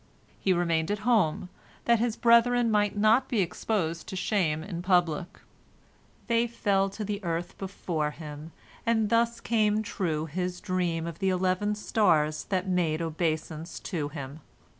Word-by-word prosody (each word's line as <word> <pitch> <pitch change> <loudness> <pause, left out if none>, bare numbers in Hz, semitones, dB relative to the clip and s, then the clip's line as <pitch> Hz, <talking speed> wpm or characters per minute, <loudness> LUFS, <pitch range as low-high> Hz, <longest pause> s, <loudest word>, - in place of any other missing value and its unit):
He 190 - +1
remained 170 -2 +1
at 205 - 0
home, 190 -7 +2 0.4
that 235 -1 +4
his 230 -1 0
brethren 235 0 +4
might 205 -1 +1
not 225 +5 +4
be 235 - 0
exposed 170 -2 -2
to - - -6
shame 180 -5 0
in 175 -2 -5
public. 175 -2 +1 0.9
They 235 0 +2
fell 195 -4 +1
to 210 +2 -6
the 205 0 -4
earth 170 0 -3
before 175 -5 -2
him, 150 0 -9 0.3
and 220 -2 +1
thus 235 0 +2
came 215 -2 +1
true 160 -7 -2
his 180 +3 -3
dream 175 -4 -1
of 170 -1 -6
the 195 - +1
eleven 185 +3 +1
stars 165 -8 +1
that 185 -1 -1
made 175 -4 +1
obeisance 160 0 -3
to 155 -7 -3
him. 140 0 -7
185 Hz, 150 wpm, -28 LUFS, 165-215 Hz, 0.9 s, that